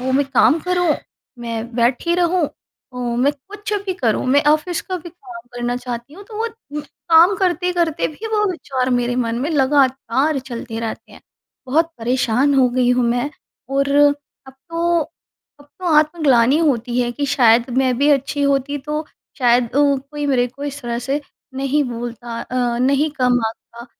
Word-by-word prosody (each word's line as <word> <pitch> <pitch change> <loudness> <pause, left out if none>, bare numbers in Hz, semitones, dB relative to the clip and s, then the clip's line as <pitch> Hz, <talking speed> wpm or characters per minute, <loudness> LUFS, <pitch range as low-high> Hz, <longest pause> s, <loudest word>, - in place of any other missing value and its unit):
वो 260 +1 -1
मैं 280 +1 +3
काम 270 +2 +4
करूँ, 355 -3 +1 0.4
मैं 235 0 -5
बैठी 245 +8 +1
रहूँ 355 -1 +2 0.5
अ, 250 - -11
मैं 245 +3 +1
कुछ 410 +9 -9
भी 375 - -1
करूँ 240 - 0
मैं 280 +3 +4
ऑफिस 325 +2 -1
का 370 - -4
भी 345 - -10
काम 360 0 -11
करना 245 0 -2
चाहती 245 +2 -6
हूँ 400 +3 -12
तो 430 -2 -8
वो 460 +1 0 0.3
काम 335 +5 +3
करते-करते 355 -3 0
भी 360 +9 -8
वो 420 - +2
विचार 260 -6 -2
मेरे 245 0 0
मन 235 -2 -1
में 290 +5 -1
लगातार 275 -1 +2
चलते 235 -3 -6
रहते 225 -1 -6
हैं। - - -14 0.5
बहुत 320 +6 +2
परेशान 250 +3 +1
हो 260 -2 +4
गई 250 0 +2
हूँ 250 0 +2
मैं 245 +4 0 0.4
और 275 0 +2 0.6
अब 265 - -12
तो 335 +5 -1 0.6
अब - - -15
तो 370 - -9
आत्मग्लानी 295 -4 +3
होती 250 -6 +1
है 240 -1 0
कि 285 +3 -2
शायद 240 -3 +4
मैं 255 -2 +2
भी 285 +1 +3
अच्छी 280 +1 +1
होती 280 0 +1
तो 300 +3 -4 0.3
शायद 245 -1 +4
अ, 230 - -10
कोई 290 +1 0
मेरे 250 -3 +2
को 275 +4 -9
इस 285 0 -5
तरह 235 -1 -3
से 280 +2 0 0.3
नहीं 275 +2 +1
बोलता 235 -1 -6
अ, 245 -2 -1
नहीं 275 +4 +2
कम 250 -1 +3
आँकता 235 +2 -9
270 Hz, 175 wpm, -19 LUFS, 245-310 Hz, 0.6 s, काम